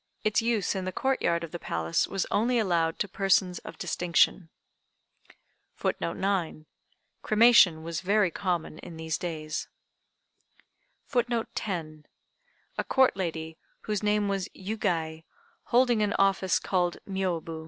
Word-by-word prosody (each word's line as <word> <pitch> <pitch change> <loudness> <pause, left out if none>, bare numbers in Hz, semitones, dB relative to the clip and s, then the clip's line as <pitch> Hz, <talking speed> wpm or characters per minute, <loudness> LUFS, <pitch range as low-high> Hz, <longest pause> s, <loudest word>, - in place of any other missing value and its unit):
Its 215 +2 +2
use 225 -3 0
in 190 -2 -3
the 185 - -2
Court 265 +8 0
yard 170 0 +1
of 165 - -7
the 175 - -5
Palace 80 - -1
was 195 -1 -2
only 235 +4 +2
allowed 170 -6 +1
to 205 - -1
persons 190 -2 +1
of - - -10
distinction.] 175 0 +1 1.3
[Footnote 170 - -2
9: 185 -5 -1 0.6
Cremation 215 -7 +5
was 165 -1 -4
very 200 -1 +2
common 175 -4 -2
in 170 -2 -10
these 160 0 -3
days.] 155 -4 -4 1.4
[Footnote 240 -3 0
10: 155 -6 -5 0.7
A - - +1
Court 265 -5 +3
lady, 160 -3 -4 0.2
whose 210 -2 -2
name 210 -1 +1
was 195 -2 -2
Yugei, 170 -6 -2 0.4
holding 240 -2 +3
an 205 -1 +1
office 195 -1 +2
called 175 -2 0
"Miôbu." 175 -4 -2
185 Hz, 130 wpm, -28 LUFS, 165-210 Hz, 1.4 s, Cremation